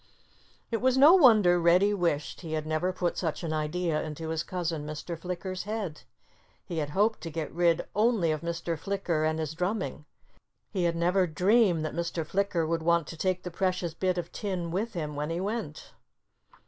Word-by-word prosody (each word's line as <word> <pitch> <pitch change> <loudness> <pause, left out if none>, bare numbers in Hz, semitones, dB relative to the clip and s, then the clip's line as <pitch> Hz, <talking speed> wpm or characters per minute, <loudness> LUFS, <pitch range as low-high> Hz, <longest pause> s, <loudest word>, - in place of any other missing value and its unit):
It 230 - -1
was 260 0 +3
no 290 +5 +8
wonder 215 - +6
Reddy 180 +5 +4
wished 170 -6 -1
he 160 -3 -6
had 155 -1 -2
never 155 +4 0
put 180 -1 -2
such 165 -1 -2
an 160 -2 -2
idea 155 +1 -1
into 160 +1 -5
his 160 -1 -1
cousin 170 -4 -3
Mr. 155 +3 -5
Flicker's 180 +2 -5
head. 205 -8 -4 0.6
He 170 - -3
had 145 -2 -2
hoped 215 +2 +2
to 165 - -5
get 160 -1 -5
rid 170 0 +2
only 210 -6 +3
of 155 - -2
Mr. 170 0 -3
Flicker 180 -4 -1
and 155 0 +1
his 160 -1 -3
drumming. 180 -3 -3 0.7
He 185 -4 0
had 170 -1 +1
never 180 +2 +2
dreamed 180 0 +3
that 155 - -4
Mr. 170 0 -2
Flicker 185 -1 0
would 165 +1 -1
want 170 0 +2
to - - -7
take 185 +2 -1
the 180 - -5
precious 180 -2 -1
bit 185 +2 0
of 175 -1 -4
tin 185 -5 -3
with 215 +6 -2
him 150 -5 -4
when 150 +1 -3
he 165 +1 -2
went. 200 -5 -4
170 Hz, 190 wpm, -28 LUFS, 160-190 Hz, 0.7 s, no